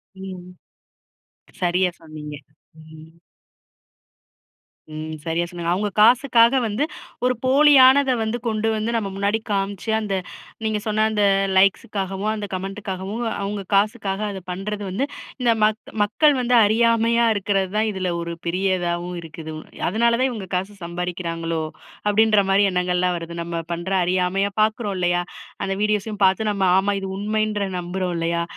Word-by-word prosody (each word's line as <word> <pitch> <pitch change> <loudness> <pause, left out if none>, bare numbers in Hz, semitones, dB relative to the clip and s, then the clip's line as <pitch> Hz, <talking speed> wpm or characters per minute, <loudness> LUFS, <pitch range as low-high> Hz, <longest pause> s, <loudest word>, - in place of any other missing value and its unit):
ம், 190 -1 -7
ம். 180 +1 -12 1.1
சரியா 180 +1 +2
சொன்னீங்க! 155 -2 -9 0.5
ம். 160 +1 -14 1.8
ம்.சரியா 160 +2 -3
சொன்னீங்க, 170 -1 -3
அவுங்க 205 +2 -1
காசுக்காக 245 +1 +5
வந்து 215 +7 -1 0.4
ஒரு 250 - +3
போலியானத 270 -1 +6
வந்து 220 +2 -2
கொண்டு 220 0 0
வந்து 220 +2 -1
நம்ம 205 -3 -2
முன்னாடி 200 +2 0
காமிச்சு, 200 +1 -2
அந்த 205 -2 -3 0.5
நீங்க 215 -1 0
சொன்ன 215 0 +2
அந்த 210 -1 +1 0.3
லைக்ஸுக்காகவும் 195 +1 +1
அந்த 210 -1 -4
கமென்ட்டுக்காகவும் 195 +3 -4 0.2
அவுங்க 200 0 -3
காசுக்காக 200 -1 0
அத 195 - -6
பண்றது 205 +3 -4
வந்து, 210 +9 -1 0.4
இந்த 240 -1 +4
மக் 215 +1 0
மக்கள் 285 +8 +3
வந்து 245 0 +2
அறியாமையா 230 +1 +3
இருக்கிறது 195 -2 0
தான் 220 0 +2
இதில 185 -2 -2
ஒரு 170 0 -4
பெரியதாவும் 180 -1 -1
இருக்குது. 160 -1 -8 0.4
அதனால, 235 +5 +2
தான் 260 0 +2
இவுங்க 215 -6 -6
காசு 190 +3 -2
சம்பாரிக்கிறாங்களோ! 170 -1 -3 0.4
அப்பிடின்றமாரி 205 -2 +4
எண்ணங்கள்லாம் 180 0 +1
வருது. 170 0 -7
நம்ம 170 -1 -4
பண்ற 175 +3 -5
அறியாமையா 185 +3 +1
பார்க்குறோம் 215 -2 0
இல்லயா! 175 0 +1 0.4
அந்த 195 0 -1
வீடியோஸையும் 210 -1 0
பார்த்து 210 +3 +2
நம்ம 200 -1 -1
ஆமா 200 +1 +2
இது 190 - -4
உண்மைன்ற 215 0 -1 0.2
நம்புறோம் 180 0 -3
இல்லயா! 170 0 0
195 Hz, 130 wpm, -22 LUFS, 180-215 Hz, 1.8 s, போலியானத